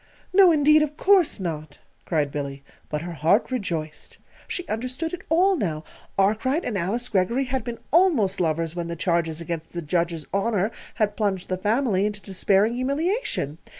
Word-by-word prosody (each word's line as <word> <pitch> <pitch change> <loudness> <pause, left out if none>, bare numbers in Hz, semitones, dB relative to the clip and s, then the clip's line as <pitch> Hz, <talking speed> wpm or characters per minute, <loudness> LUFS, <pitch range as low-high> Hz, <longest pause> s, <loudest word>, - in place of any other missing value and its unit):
"No, 375 -2 +7
indeed, 305 0 +5
of 300 0 -2
course 375 - +4
not!" 155 -5 -5 0.3
cried 150 -4 0
Billy; 140 -1 -5 0.3
but 150 +1 -3
her 175 - -5
heart 170 - +2
rejoiced. 165 -10 -4 0.3
She 360 - -4
understood 255 +9 -3
it 360 - -5
all 370 +5 +4
now. 160 - -2 0.3
Arkwright 220 - +1
and 235 - -2
Alice 200 +7 -1
Greggory 225 +6 +1
had 260 -2 -2
been 235 0 -5
almost 285 - +3
lovers 165 0 -1
when 170 -1 -3
the 170 - -4
charges 170 -2 0
against 165 -1 -5
the 170 - -3
Judge's 170 0 -1
honor 200 0 +1 0.2
had 210 -1 0
plunged 195 -4 -1
the 185 - 0
family 210 -1 +1
into 210 -1 -5
despairing 200 +2 +1
humiliation. 275 - -1
200 Hz, 165 wpm, -24 LUFS, 170-260 Hz, 0.3 s, No